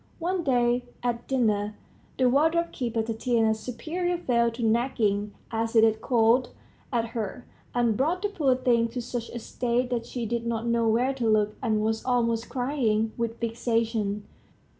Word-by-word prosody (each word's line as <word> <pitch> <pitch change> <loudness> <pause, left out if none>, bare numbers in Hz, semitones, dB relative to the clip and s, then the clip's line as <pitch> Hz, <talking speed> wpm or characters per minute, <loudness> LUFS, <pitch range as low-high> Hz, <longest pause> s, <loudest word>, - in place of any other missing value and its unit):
One 355 +1 -1
day, 245 -3 +2 0.2
at 240 -1 -2
dinner, 215 -5 +1 0.4
the 255 - +4
wardrobe 320 +6 +2
keeper, 235 -3 -2
Tatiana's 225 -1 +1
superior, 325 +10 -2
fell 235 -7 +2
to 235 +1 -5
nagging, 220 -3 +1 0.2
as 225 0 -2
it 220 - +7
is 220 -1 +4
called, 235 +1 +3 0.4
at 230 -2 0
her, 230 +1 -5 0.3
and 235 -3 +2
brought 330 - 0
the 415 - +1
poor 295 -10 +2
thing 240 -2 +2
to 240 +2 -5
such 240 -1 -4
a - - -6
state 245 +2 -1
that 235 -1 -2
she 245 -2 -4
did 235 +1 -2
not 230 -1 -2
know 235 -1 +2
where 245 +5 +2
to 240 -4 -1
look, 210 -1 +2
and 215 -4 +1
was 220 0 0
almost 230 -2 0
crying 245 -5 0
with 230 -1 -3
vexation. 225 -3 -1
235 Hz, 165 wpm, -27 LUFS, 225-250 Hz, 0.4 s, it